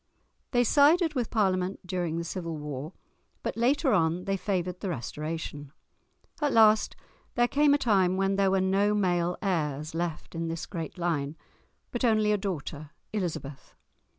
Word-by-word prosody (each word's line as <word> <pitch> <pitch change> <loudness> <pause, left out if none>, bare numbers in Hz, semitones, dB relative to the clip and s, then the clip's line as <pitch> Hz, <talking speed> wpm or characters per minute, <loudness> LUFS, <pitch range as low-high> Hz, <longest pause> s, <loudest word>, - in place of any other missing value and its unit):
They 245 -1 +3
sided 305 - +4
with 250 -5 -1
Parliament 190 -3 0
during 175 -3 -2
the 170 - -2
Civil 170 -2 -4
War, 150 +2 -6 0.5
but - - -2
later 265 +4 +2
on 170 -1 +1
they 195 -1 0
favoured 180 -2 -2
the 195 - -3
Restoration. 150 0 -5 0.7
At 290 -2 +1
last 220 -1 +5 0.4
there 240 -1 +3
came 285 +2 +4
a - - +3
time 190 -8 +2
when 195 0 +1
there 195 -1 +3
were 190 0 +2
no 200 +2 +2
male 175 -3 +1
heirs 155 -6 -1
left 165 -1 -4
in 165 0 -3
this 165 0 -4
great 165 -1 -6
line, 160 -4 -1 0.5
but 240 - -3
only 215 -3 +3
a 210 - +3
daughter, 155 -6 -5 0.2
Elizabeth. 160 -8 -4
185 Hz, 155 wpm, -28 LUFS, 165-210 Hz, 0.7 s, last